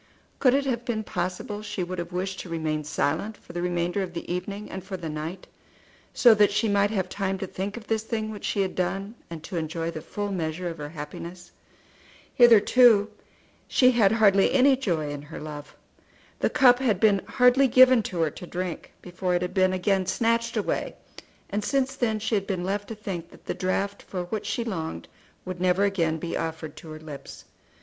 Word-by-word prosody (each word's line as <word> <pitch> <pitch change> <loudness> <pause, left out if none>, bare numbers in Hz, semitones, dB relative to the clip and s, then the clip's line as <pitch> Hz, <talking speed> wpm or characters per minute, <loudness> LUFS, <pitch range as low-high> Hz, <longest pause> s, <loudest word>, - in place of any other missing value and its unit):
Could 255 -1 +4
it 280 0 +1
have 240 -3 -1
been 225 -3 -2
possible 185 +3 -4
she 210 -3 -4
would 180 +1 -5
have 170 +1 -5
wished 190 +2 -3
to 180 - -7
remain 155 -2 -2
silent 155 +8 -1
for - - -14
the 175 - -3
remainder 175 +2 -1
of 180 -2 -4
the 170 - -5
evening 200 +3 -4
and 190 -1 -6
for 190 0 -6
the 165 -3 -5
night, 155 +5 -5 0.7
so 240 -3 +6
that 210 -1 +5
she 210 +2 +1
might 200 0 +3
have 190 -4 -1
time 195 0 -2
to 195 - -4
think 195 +4 -5
of 225 - -9
this 220 -1 0
thing 220 -1 -3
which 210 -2 -9
she 200 - 0
had 190 - -3
done, 195 +3 -2 0.2
and 165 -2 -8
to 175 - -5
enjoy 165 +1 -2
the 155 - -6
full 205 +4 -4
measure 170 -1 -3
of 165 -2 -6
her 145 0 -5
happiness. 170 +3 -8 0.8
Hitherto 230 -2 +6 0.6
she 255 -1 +5
had 225 -4 +4
hardly 200 -3 +5
had - - -2
any 270 +1 +6
joy 170 - -1
in 145 -1 -5
her 145 - -9
love. 150 -1 -8 0.6
The - - +2
cup 250 -2 +5
had 225 -8 +1
been 200 -2 +4
hardly 250 +2 +4
given 255 0 +7
to 175 -2 -2
her 160 -2 +1
to 180 - -10
drink 180 -2 -5
before 180 0 -2
it 175 - 0
had 180 0 -4
been 185 -1 +3
again 185 0 +1
snatched 230 0 +1
away, - - -2 0.6
and 205 +1 -1
since 270 +2 0
then 220 -3 0
she 220 +2 -3
had 200 -2 +1
been 185 -3 -2
left 200 +2 -2
to 225 - -6
think 185 -5 -6
that - - -18
the - - -2
draught 195 +2 -2
for 180 -2 -5
which 200 +4 -4
she 235 - -1
longed 160 - -4 0.4
would 180 -1 -6
never 185 +2 +3
again 170 -6 +1
be 165 +1 -4
offered 160 -1 -4
to 160 - -11
her 155 0 -8
lips. 150 -3 -10
190 Hz, 210 wpm, -26 LUFS, 170-215 Hz, 0.8 s, given